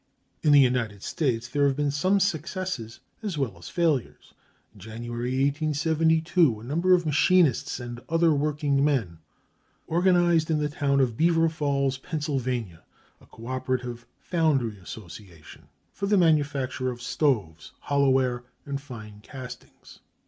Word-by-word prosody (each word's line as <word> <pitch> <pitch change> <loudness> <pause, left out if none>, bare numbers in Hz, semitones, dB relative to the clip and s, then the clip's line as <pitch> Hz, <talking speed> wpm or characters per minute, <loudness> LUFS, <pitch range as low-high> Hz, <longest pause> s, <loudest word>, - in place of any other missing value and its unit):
(327) - - -2
In - - +6
the 130 -3 +5
United 100 -1 -15
States 125 -8 -1
there 140 +3 +2
have 135 - 0
been 145 0 0
some 185 +8 +2
successes 180 - -3 0.2
as 205 -7 -4
well 130 -9 -2
as 85 - -11
failures. 160 -8 -1 0.4
In - - -17
January, 120 +4 -5
1872, 160 - +2
a - - -12
number 170 +8 +3
of 175 -1 -1
machinists 155 -3 +2
and 120 -1 -7
other 165 0 +3
working 145 -1 0
men 115 - 0 0.7
organized 175 -2 +3
in 160 - +2
the 150 0 -1
town 140 -2 +1
of 120 -4 0
Beaver 165 0 +3
Falls, 140 -4 -1
Pennsylvania, 130 - -3 0.4
a - - -19
Co 115 - -13
operative 125 -2 -3
Foundry 140 - 0
Association 85 -3 -12 0.3
for 200 - -3
the 205 0 +3
manufacture 145 -6 +1
of 120 -1 -6
stoves, 115 - -1
hollow 140 -1 +2
ware, 130 -2 +1 0.2
and 140 -1 -4
fine 110 -7 -10
castings. 130 +2 -11
140 Hz, 140 wpm, -26 LUFS, 120-160 Hz, 0.7 s, In